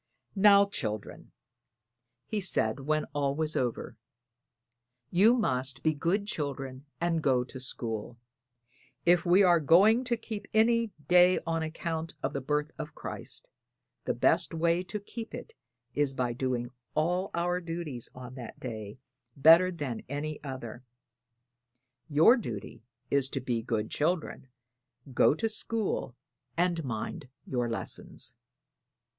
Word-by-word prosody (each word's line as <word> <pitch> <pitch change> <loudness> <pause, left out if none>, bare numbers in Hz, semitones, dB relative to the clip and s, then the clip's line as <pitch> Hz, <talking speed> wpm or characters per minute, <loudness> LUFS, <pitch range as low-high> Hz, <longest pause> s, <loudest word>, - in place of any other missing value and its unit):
"Now, 200 0 +7
children," 110 - -5 0.9
he 215 -2 -2
said 120 - +1
when 155 +3 0
all 140 -1 0
was 155 0 0
over, 125 -3 -2 1.1
"you 210 +7 +6
must 135 - -1
be 155 - +3
good 175 +7 0
children 140 -6 -4
and 170 -1 +1
go 130 -4 +3
to 130 +1 -9
school. 115 -2 -5 0.9
If 175 +1 +4
we 185 +3 +6
are 175 -2 +5
going 200 - +5
to 240 -1 0
keep 215 -2 -7
any 230 0 +4 0.2
day 180 +1 +6
on 165 0 0
account 160 0 -4
of - - -1
the 140 - -2
birth 150 +3 -1
of 155 0 -6
Christ, - - -6 0.5
the - - 0
best - - +2
way 170 +2 +2
to 210 +3 -4
keep 225 +3 -8
it 245 - -9 0.4
is 140 -1 0
by 125 -2 0
doing 125 -1 -2 0.2
all 180 +5 +1
our 175 +1 0
duties 165 -8 -5
on 125 -1 -9
that 125 -3 -9
day 110 -4 -6 0.4
better 165 +6 +7
than 145 -9 -4
any 150 +2 -4
other. 130 -3 -7 1.3
Your 160 - +6
duty 115 - -6 0.3
is 140 -2 +2
to 135 - -2
be 120 -3 -1
good 110 -2 -2
children, 160 -3 -1 0.7
go 135 - +5
to 225 - 0
school 220 - -2 0.4
and 170 -1 +1
mind 130 +4 -5 0.2
your 120 -2 -1
lessons." 115 - -4
155 Hz, 135 wpm, -29 LUFS, 130-180 Hz, 1.3 s, Now